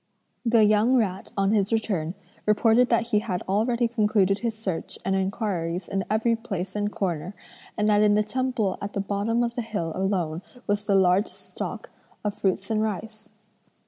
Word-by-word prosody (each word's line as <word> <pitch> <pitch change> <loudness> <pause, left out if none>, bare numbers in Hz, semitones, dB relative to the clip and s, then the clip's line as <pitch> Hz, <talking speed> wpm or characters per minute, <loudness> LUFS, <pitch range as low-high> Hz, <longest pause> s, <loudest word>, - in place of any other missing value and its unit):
The 230 -2 +4
young 215 +4 +4
rat 195 -6 0
on 195 0 +2
his 205 -1 +2
return 195 -7 -1 0.3
reported 225 +3 +4
that 230 0 +2
he 210 - +3
had 200 -5 -3
already 235 +5 +1
concluded 210 -4 +2
his 230 -1 -2
search 190 -7 -4
and 195 0 +1
inquiries 190 -3 -2
in 195 -1 -2
every 225 +2 +2
place 195 -5 -5
and 205 0 -1
corner, 180 -1 -3 0.4
and 210 -1 +2
that 210 -1 +4
in 210 -1 +5
the 210 - +3
temple 225 -3 -1
at 200 +1 -5
the - - -2
bottom 205 +4 0
of 235 0 -1
the 240 - -2
hill 210 -8 -3
alone 180 -4 -1 0.2
was 205 0 -1
the 200 - +2
largest 190 +2 +2
stock - - -5 0.3
of 210 -1 -1
fruits 195 +1 -1
and 215 -1 +2
rice. 215 +1 -4
210 Hz, 175 wpm, -25 LUFS, 195-225 Hz, 0.4 s, in